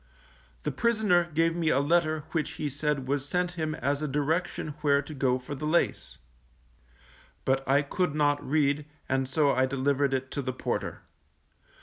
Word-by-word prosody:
The - - -1
prisoner 215 -7 +2
gave 165 +2 +2
me 165 -2 +1
a 140 - +3
letter 155 +1 +2
which 160 -3 -1
he 150 - -3
said 145 -1 -1
was 140 0 0
sent 180 +4 -1
him 155 -3 -3
as 140 0 -1
a 155 - -1
direction 155 +4 -1
where 140 -2 +4
to 145 +2 -6
go 130 -2 +1
for 130 +3 -7
the 145 +2 -4
lace; 170 +3 0 1.3
but 135 0 +2
I 140 +2 +4
could 155 +2 -1
not 145 -1 +2
read, 145 0 +1 0.2
and 135 0 0
so 145 +1 +3
I 130 0 +2
delivered 135 +1 +1
it 130 0 -4
to 140 - -2
the 130 -1 -3
porter. - - -3
145 Hz, 175 wpm, -28 LUFS, 135-155 Hz, 1.3 s, where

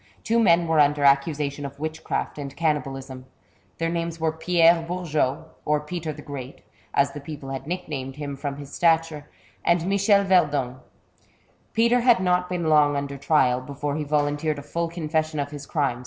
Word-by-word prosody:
Two 230 +1 +2
men 170 -6 +4
were 160 -1 +2
under 145 0 +3
accusation 140 +1 +2
of 140 0 -7
witchcraft 155 -1 -3
and 140 -1 -6
cannibalism. 135 -4 -2 0.5
Their 165 0 -1
names 170 -1 -3
were 160 -1 +1
Pierre 165 +1 +4
Bourgot, 160 -4 -1
or 150 0 +1
Peter 160 +1 -5
the 150 0 -10
Great, 135 -2 -8 0.3
as 140 0 +2
the 145 - -7
people 145 -1 -8
had 135 +1 -6
nick 180 +1 -4
named 135 -3 -5
him 145 -1 -5
from 140 0 -4
his 145 -1 -10
stature, 165 -3 +1 0.3
and 170 -1 +2
Michel 200 +1 +3
Verdung. 145 -9 +2 0.9
Peter 235 +2 +3
had 240 -3 +5
not 180 -1 +1
been 175 -2 -2
long 150 -2 +4
under 140 0 -4
trial, 130 -3 +2
before 140 +2 -4
he 155 - -2
volun 145 0 0
teered 155 -1 -1
a 140 - -7
full 170 +3 -2
confession 155 -2 -2
of 145 0 -3
his 145 -1 -8
crimes. 140 -6 0
150 Hz, 180 wpm, -24 LUFS, 140-170 Hz, 0.9 s, had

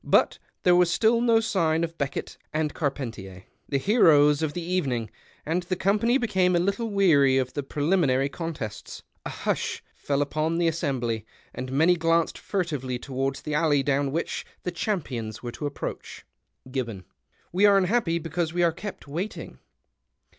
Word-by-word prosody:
But - - +3 0.2
there 180 -1 +5
was 180 -1 +4
still 225 +6 +3
no 230 -2 +4
sign 170 -7 +1
of 165 0 -3
Heekitt 140 -3 -4 0.2
and 155 -1 -1
C'ar 145 - 0
|)entier, 100 -9 -8 0.3
the 140 - +1
heroes 150 - +5
of 155 -2 -1
the 175 - -4
evening, 135 - -1 0.3
and 165 +4 0
the 180 +1 -2
eonipanv 215 +8 +2
became 190 -6 +2
a - - +4
little 200 +6 0
weary 155 -10 +4
of 130 -1 -1
the 145 - -2
jH 145 +2 -3
eliniinary 140 -7 +2
contests. 150 -12 -6
\ - - -8
hush - - -2
fell 140 0 0
upon 155 +3 -1
the 170 -1 +2
assembly, 130 -9 -1 0.3
and 130 0 -5
many 160 +6 +4
glanced 165 0 +1
furtively 150 -10 -2
towards 135 +1 -3
the 150 - -4
alley 150 -2 +3
down 140 0 +1
which 165 +4 -2 0.2
the 180 - -2
cham 190 0 -1
pions 115 -4 -6
were 120 - -4
to 145 - -4
approach. 145 - -6 0.4
(iinnoN. 120 -7 -4 0.2
— - - -52
'' - - -38
\\V 195 +3 +4
are 200 -1 +6
un 195 - +4
happy 185 -4 +1
because 165 0 -2
wc 175 0 +3
arc 165 0 0
ke|)t 205 -2 -6
waiting. 175 +9 -5
160 Hz, 180 wpm, -26 LUFS, 135-180 Hz, 0.4 s, are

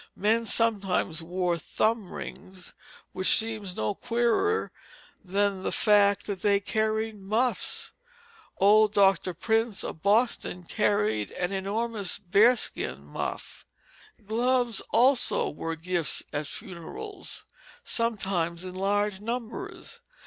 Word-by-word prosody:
Men 225 +3 +1
sometimes 195 -8 +2
wore 175 0 -1
thumb 220 +2 -1
rings, 185 -1 -9 0.4
which 185 0 +4
seems 215 -4 -3
no 110 - -1
queerer 240 - 0 0.5
than 200 0 0
the - - -2
fact 205 -2 +3
that 200 -3 -5
they 200 -1 +3
carried 220 +1 -1
muffs. 225 +6 -1 0.6
Old 210 +2 +5
Dr. 195 -3 +3
Prince 225 -2 0
of 160 - -7
Boston 205 -3 +1
carried 205 - 0
an 180 +1 -2
enormous 200 +1 -1
bearskin 200 - +2
muff. 75 - -6 0.6
Gloves 240 +1 +1
also 250 +2 +4
were 165 +2 -4
gifts 170 0 -1
at 145 0 -2
funerals, 200 - -6 0.4
sometimes 190 -7 0
in 185 -1 -7
large 200 +1 0
numbers. 250 - -6
205 Hz, 105 wpm, -27 LUFS, 185-225 Hz, 0.6 s, Old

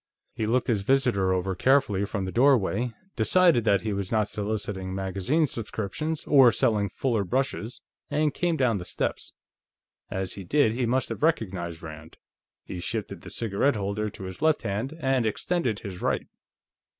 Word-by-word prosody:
He 110 - -2
looked 125 +3 +2
his 110 -5 +1
visitor 115 -5 +2
over 95 +1 0
carefully 105 -2 +2
from 100 -1 -3
the 95 - -4
doorway, 120 -2 +3 0.2
decided 125 - +4
that 100 -3 +3
he 110 -1 -2
was 100 -2 -3
not 110 -2 +2
soliciting 100 -3 -3
magazine 95 - 0
subscriptions 120 +6 -4
or 135 -4 +7
selling 105 -1 +1
Fuller 115 0 0
brushes, 120 +1 -2 0.3
and 150 -1 +1
came 175 -2 0
down 120 -7 +2
the - - -6
steps. - - -3 0.8
As 95 -1 -2
he 100 - -7
did, 130 +4 +3
he 120 +1 -1
must 130 +3 0
have - - -5
recognized 95 - -1
Rand; 80 0 -10 0.5
he 90 - -6
shifted 85 - -4
the - - -10
cigarette 115 +5 0
holder 105 +1 -2
to 100 - -10
his 95 +5 -8
left 155 -1 +2
hand 115 +10 -3
and 135 -3 +2
extended 120 - -1
his 95 -3 -7
right. - - 0
110 Hz, 165 wpm, -26 LUFS, 95-130 Hz, 0.8 s, or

